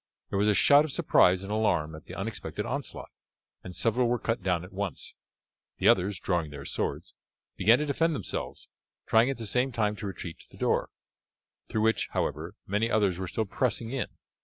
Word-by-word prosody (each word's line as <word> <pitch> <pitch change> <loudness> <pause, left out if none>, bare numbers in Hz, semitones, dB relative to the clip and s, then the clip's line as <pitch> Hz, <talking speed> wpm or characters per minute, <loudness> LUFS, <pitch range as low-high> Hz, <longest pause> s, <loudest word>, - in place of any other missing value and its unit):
There 100 - 0
was 105 - +3
a 105 - +4
shout 145 +9 +7
of 155 - -3
surprise 95 - +4
and 100 - -6
alarm 90 -8 +1
at 80 0 -11
the - - -9
unexpected - - -4
onslaught, - - -5 0.5
and 90 0 -8
several 120 +2 +1
were 120 +1 +1
cut 115 0 -2
down 90 -3 0
at 90 +2 -12
once. 100 -1 -5 0.6
The - - +2
others, 95 +1 +3
drawing 85 -4 -1
their 70 -1 -9
swords, - - -3 0.4
began 110 +6 +5
to 150 - -1
defend 160 +3 +1
themselves, - - -5 0.4
trying 115 +3 +4
at 135 - -2
the 115 - -6
same 125 +5 +1
time 105 -3 0
to 105 -1 -5
retreat 85 -3 -7
to - - -16
the - - -16
door, - - +1 0.8
through 110 - 0
which, 110 +1 +2
however, - - -2
many 105 +4 0
others 100 -6 +2
were 95 - -3
still 110 +5 -1
pressing 115 +2 -1
in. 135 -1 -2
105 Hz, 195 wpm, -28 LUFS, 90-120 Hz, 0.8 s, shout